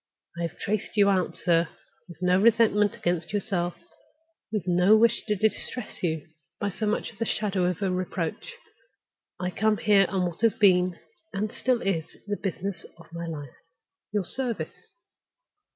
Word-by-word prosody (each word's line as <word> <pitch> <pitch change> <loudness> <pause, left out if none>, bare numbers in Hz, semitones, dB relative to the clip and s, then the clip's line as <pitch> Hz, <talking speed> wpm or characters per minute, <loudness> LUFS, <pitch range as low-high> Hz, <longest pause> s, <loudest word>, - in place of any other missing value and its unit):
I 170 - -5
have 170 -2 -3
traced 215 +1 -3
you 200 -1 +6
out, 185 -2 0
sir, 170 -1 +2 0.4
with 175 0 -10
no 180 +1 +4
resentment 215 -2 +4
against 175 -1 -1
yourself, 195 -4 -1 0.8
with 210 -5 -1
no 180 +4 +5
wish 230 +1 +3
to 210 - +2
distress 220 +4 -1
you 160 -4 -1 0.3
by 205 - -1
so 215 +3 -3
much 210 - -1
as 220 - -20
the 230 - 0
shadow 200 -4 0
of 180 +2 -1
a 190 - +1
reproach. 185 - -3 0.8
I 180 0 -2
come 215 +2 +2
here 200 -3 +4
on 190 -2 0
what 175 +2 -5
has 230 -2 +4
been, 180 -3 +4 0.4
and 205 +2 -2
is - - -13
still, 255 -1 +2
the 195 +1 -3
business 195 -1 -3
of 170 -1 -17
my 170 0 -5
life—your 165 +6 -7
service." 245 +3 -2
195 Hz, 160 wpm, -27 LUFS, 175-210 Hz, 0.8 s, you